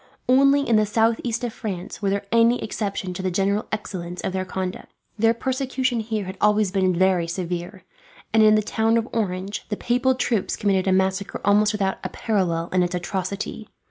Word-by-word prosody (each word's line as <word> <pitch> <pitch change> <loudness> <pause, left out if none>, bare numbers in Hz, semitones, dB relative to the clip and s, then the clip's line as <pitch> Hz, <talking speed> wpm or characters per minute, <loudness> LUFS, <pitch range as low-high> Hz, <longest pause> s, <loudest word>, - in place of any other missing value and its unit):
Only 275 +2 +4
in 230 - +4
the 215 - +3
southeast 225 +2 +1
of 240 -2 -2
France 195 -1 -6
was 200 - +1
there 200 0 -1
any 230 +1 +4
exception 200 -4 -3
to 180 - -5
the 185 - 0
general 200 +3 0
excellence 180 -4 -5
of 185 - -3
their 185 0 -2
conduct. 185 0 -5 0.3
Their 225 +1 +4
persecution 260 -1 -1
here 220 -2 -3
had 190 +1 -7
always 210 -2 +3
been 185 -2 +1
very 180 -1 +2
severe, 175 +1 -4 0.5
and 220 - +5
in 215 0 +6
the 215 - +2
town 225 +2 +1
of 230 0 -1
Orange 195 -2 -3
the 210 - -2
papal 255 +2 +1
troops 230 -5 0
committed 195 -2 +1
a - - +3
massacre 190 +1 0
almost 210 +1 +4
without 195 -3 -1
a - - -3
parallel 175 -7 -1
in 185 - +2
its 180 0 0
atrocity. 190 +4 -4
205 Hz, 190 wpm, -23 LUFS, 185-225 Hz, 0.5 s, in